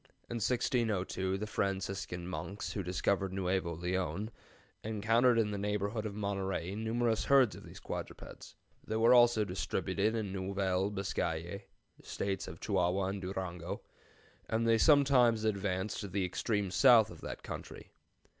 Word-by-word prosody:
In 120 Hz, -, -2 dB
1602 105 Hz, -5 st, 0 dB
the 105 Hz, -, -3 dB
Franciscan 95 Hz, -3 st, -3 dB
monks 100 Hz, +2 st, -5 dB
who 100 Hz, -, -2 dB
discovered 95 Hz, +1 st, 0 dB
Nuevo 95 Hz, -2 st, -1 dB
Leon 90 Hz, +4 st, -2 dB, 0.5 s
encountered 115 Hz, +3 st, +3 dB
in 110 Hz, -2 st, +2 dB
the 100 Hz, -, -3 dB
neighborhood 105 Hz, +2 st, -1 dB
of 100 Hz, -, -7 dB
Monterey 95 Hz, -3 st, -2 dB
numerous 110 Hz, +1 st, 0 dB
herds 135 Hz, -5 st, +5 dB
of -, -, -11 dB
these -, -, -11 dB
quadrupeds. -, -, -8 dB, 0.3 s
They 110 Hz, -, -4 dB
were 115 Hz, +2 st, +5 dB
also 120 Hz, -3 st, +5 dB
distributed 100 Hz, +3 st, -1 dB
in 105 Hz, -4 st, -2 dB
Nouvelle 95 Hz, 0 st, 0 dB
Biscaye 95 Hz, -2 st, -3 dB, 0.4 s
(States 100 Hz, -1 st, -3 dB
of 80 Hz, -, -8 dB
Chihuahua 95 Hz, -1 st, +1 dB
and 100 Hz, 0 st, -4 dB
Durango), 90 Hz, -2 st, -5 dB, 0.7 s
and 115 Hz, +1 st, +1 dB
they 115 Hz, -1 st, +4 dB
sometimes 130 Hz, -6 st, +5 dB
advanced 100 Hz, -1 st, -1 dB
to 100 Hz, -, -4 dB
the 95 Hz, 0 st, -1 dB
extreme 100 Hz, +1 st, -1 dB
south 110 Hz, +2 st, +6 dB
of -, -, -12 dB
that -, -, -7 dB
country. -, -, -8 dB
100 Hz, 140 wpm, -33 LUFS, 95-110 Hz, 0.7 s, south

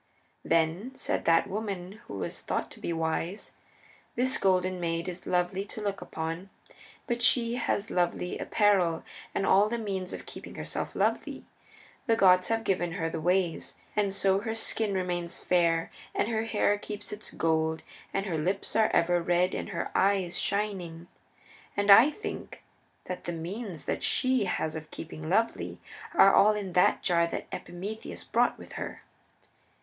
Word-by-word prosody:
Then 165 Hz, +9 st, +1 dB
said -, -, -2 dB
that 165 Hz, 0 st, +5 dB
woman 200 Hz, 0 st, -5 dB
who -, -, -7 dB
was -, -, -4 dB
thought -, -, -2 dB
to -, -, -11 dB
be -, -, -3 dB
wise, 165 Hz, +4 st, -2 dB, 0.6 s
"This 255 Hz, +2 st, +1 dB
Golden 185 Hz, -1 st, +2 dB
Maid 165 Hz, 0 st, -1 dB
is 180 Hz, 0 st, -6 dB
Lovely 180 Hz, +2 st, +1 dB
to 215 Hz, -, -8 dB
look 200 Hz, -1 st, -2 dB
upon 165 Hz, +4 st, -5 dB, 0.6 s
because 240 Hz, -1 st, -1 dB
she 235 Hz, -1 st, +4 dB
has 220 Hz, -3 st, -1 dB
lovely 180 Hz, 0 st, 0 dB
apparel 190 Hz, -6 st, +2 dB, 0.3 s
and 195 Hz, -, +1 dB
all 200 Hz, +3 st, +5 dB
the 235 Hz, -, -1 dB
means 195 Hz, -5 st, -3 dB
of -, -, -6 dB
keeping -, -, -9 dB
herself -, -, -4 dB
lovely. -, -, -1 dB, 0.6 s
The 225 Hz, -, +4 dB
gods 185 Hz, -3 st, +5 dB
have 225 Hz, 0 st, 0 dB
given 175 Hz, -4 st, 0 dB
her 165 Hz, -3 st, -2 dB
the 160 Hz, -, -4 dB
ways, 180 Hz, 0 st, 0 dB, 0.2 s
and, 205 Hz, -2 st, +2 dB
so 195 Hz, 0 st, +2 dB
her 220 Hz, +2 st, -3 dB
skin 220 Hz, -2 st, -1 dB
remains 175 Hz, -2 st, -2 dB
fair, 170 Hz, -2 st, +2 dB, 0.2 s
and -, -, +1 dB
her 225 Hz, -1 st, 0 dB
hair 205 Hz, -2 st, +2 dB
keeps 210 Hz, 0 st, -6 dB
its 210 Hz, +1 st, -6 dB
gold, 160 Hz, 0 st, 0 dB, 0.3 s
and 195 Hz, -, -1 dB
her 170 Hz, -5 st, -1 dB
lips 185 Hz, +5 st, -1 dB
are 220 Hz, -1 st, +4 dB
ever 175 Hz, +1 st, +3 dB
red 175 Hz, +2 st, +2 dB
and -, -, -3 dB
her 170 Hz, -4 st, -3 dB
eyes 190 Hz, -2 st, +2 dB
shining. 180 Hz, -5 st, -2 dB, 0.7 s
And 205 Hz, 0 st, +4 dB
I 230 Hz, +8 st, +9 dB
think 425 Hz, +8 st, -7 dB, 0.4 s
that 180 Hz, -, -6 dB
the 175 Hz, -, -2 dB
means 170 Hz, -1 st, -5 dB
that -, -, -2 dB
she 255 Hz, -4 st, +2 dB
has 160 Hz, -3 st, -1 dB
of 155 Hz, -1 st, -7 dB
keeping 155 Hz, -1 st, -7 dB
lovely 225 Hz, +5 st, 0 dB, 0.4 s
are 195 Hz, -10 st, +7 dB
all 210 Hz, +2 st, +6 dB
in 195 Hz, -4 st, -4 dB
that 180 Hz, -, +4 dB
jar 170 Hz, -2 st, +3 dB
that -, -, -4 dB
Epimetheus 200 Hz, +5 st, -6 dB
brought -, -, +2 dB
with -, -, -12 dB
her." -, -, -6 dB
185 Hz, 165 wpm, -29 LUFS, 170-210 Hz, 0.7 s, I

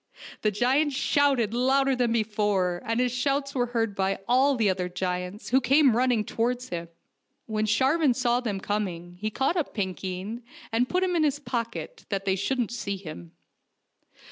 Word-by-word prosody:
The 215 Hz, -, +3 dB
giant 260 Hz, +8 st, +2 dB
shouted 270 Hz, -5 st, +2 dB
louder 265 Hz, +2 st, +3 dB
than 245 Hz, -2 st, +1 dB
before, 205 Hz, -5 st, 0 dB
and 230 Hz, +1 st, 0 dB
his 250 Hz, -1 st, +2 dB
shouts 275 Hz, +2 st, -1 dB
were 245 Hz, -2 st, 0 dB
heard 225 Hz, -3 st, -1 dB
by 195 Hz, 0 st, 0 dB
all 265 Hz, +3 st, +4 dB
the 225 Hz, -4 st, +2 dB
other 185 Hz, -1 st, 0 dB
giants, 180 Hz, +2 st, -4 dB
who 265 Hz, +2 st, +4 dB
came 275 Hz, -3 st, +4 dB
running 245 Hz, -3 st, +2 dB
towards 245 Hz, +2 st, -1 dB
him. 170 Hz, -1 st, -4 dB, 0.6 s
When 215 Hz, -1 st, -1 dB
Sharvan 265 Hz, +5 st, +3 dB
saw 245 Hz, -1 st, +2 dB
them 215 Hz, -6 st, -3 dB
coming, 180 Hz, -4 st, -3 dB
he 215 Hz, -, 0 dB
caught 270 Hz, -, 0 dB
up 325 Hz, -, -2 dB
Pinkeen, 190 Hz, +2 st, -4 dB, 0.3 s
and 240 Hz, +3 st, +1 dB
put 365 Hz, +1 st, +1 dB
him 365 Hz, -1 st, 0 dB
in 335 Hz, -, +2 dB
his 290 Hz, -2 st, +2 dB
pocket, 245 Hz, -, -5 dB
that 195 Hz, -1 st, -2 dB
they 190 Hz, -1 st, +2 dB
shouldn't 235 Hz, +4 st, -1 dB
see 205 Hz, -4 st, -3 dB
him. 155 Hz, -, -9 dB
230 Hz, 170 wpm, -27 LUFS, 200-265 Hz, 0.6 s, all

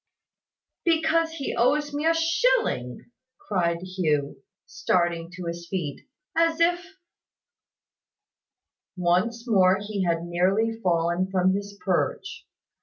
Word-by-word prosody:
"Because 325 Hz, 0 st, +2 dB
he 280 Hz, -4 st, -4 dB
owes 290 Hz, +4 st, +1 dB
me 295 Hz, +2 st, -1 dB
a 330 Hz, -, +4 dB
shilling!" 330 Hz, -, 0 dB, 0.3 s
cried 170 Hz, -3 st, -1 dB
Hugh, 150 Hz, -7 st, -1 dB, 0.2 s
starting 175 Hz, -3 st, -1 dB
to 180 Hz, 0 st, -7 dB
his 170 Hz, 0 st, -5 dB
feet, 165 Hz, -7 st, -5 dB, 0.3 s
"as 330 Hz, 0 st, +2 dB
if 350 Hz, +2 st, 0 dB, 1.0 s
" -, -, -66 dB
Once 185 Hz, +8 st, 0 dB
more 190 Hz, -4 st, +4 dB
he 205 Hz, -1 st, -3 dB
had 170 Hz, -1 st, 0 dB
nearly 190 Hz, +6 st, +1 dB
fallen 175 Hz, 0 st, +1 dB
from 185 Hz, 0 st, +2 dB
his 200 Hz, +1 st, -5 dB
perch. 185 Hz, -3 st, -2 dB
190 Hz, 110 wpm, -25 LUFS, -, 1.0 s, a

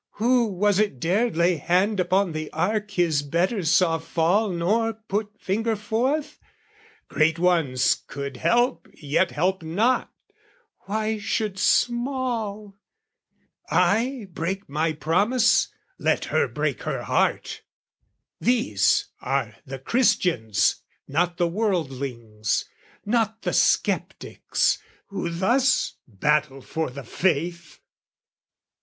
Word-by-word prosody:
"Who 240 Hz, +2 st, +2 dB
was 205 Hz, 0 st, +1 dB
it 205 Hz, -12 st, 0 dB
dared 200 Hz, -, 0 dB
lay 170 Hz, 0 st, +3 dB
hand 185 Hz, +7 st, +1 dB
upon 185 Hz, +1 st, +2 dB
the 155 Hz, -1 st, -5 dB
ark 210 Hz, +6 st, -1 dB
"His 175 Hz, -7 st, +1 dB
betters 170 Hz, -, 0 dB
saw 165 Hz, -1 st, +3 dB
fall 175 Hz, +7 st, +1 dB
nor 210 Hz, +6 st, 0 dB
put 215 Hz, -1 st, -4 dB
finger 220 Hz, +4 st, -1 dB
forth? 245 Hz, +8 st, -1 dB, 0.7 s
"Great 160 Hz, +1 st, +2 dB
ones 165 Hz, -8 st, +2 dB
could 140 Hz, -2 st, -6 dB
help 235 Hz, -, +1 dB
yet 145 Hz, -1 st, 0 dB
help 180 Hz, +9 st, 0 dB
not: 205 Hz, +11 st, 0 dB, 0.8 s
why 215 Hz, +1 st, -1 dB
should 205 Hz, -1 st, -2 dB
small? 240 Hz, -5 st, 0 dB, 0.9 s
"I 240 Hz, +2 st, +1 dB
break 185 Hz, +5 st, -3 dB
my 155 Hz, +3 st, 0 dB
promise: 190 Hz, -, +2 dB, 0.3 s
let -, -, +1 dB
her -, -, +3 dB
break -, -, -2 dB
her -, -, -3 dB
heart!" -, -, 0 dB, 0.8 s
These 105 Hz, -, +2 dB, 0.2 s
are 130 Hz, -4 st, -1 dB
the 135 Hz, 0 st, -5 dB
Christians 135 Hz, -, +1 dB, 0.3 s
not 170 Hz, +4 st, 0 dB
the 175 Hz, -1 st, +2 dB
wordlings, 135 Hz, -, -2 dB, 0.4 s
not 225 Hz, 0 st, 0 dB
The -, -, -1 dB
sceptics, -, -, +1 dB, 0.3 s
who 195 Hz, -4 st, -3 dB
thus 240 Hz, +10 st, +2 dB
battle 135 Hz, +5 st, 0 dB
for 160 Hz, +2 st, -3 dB
the 135 Hz, +2 st, -8 dB
faith! 170 Hz, +4 st, -2 dB
180 Hz, 110 wpm, -24 LUFS, 155-220 Hz, 0.9 s, lay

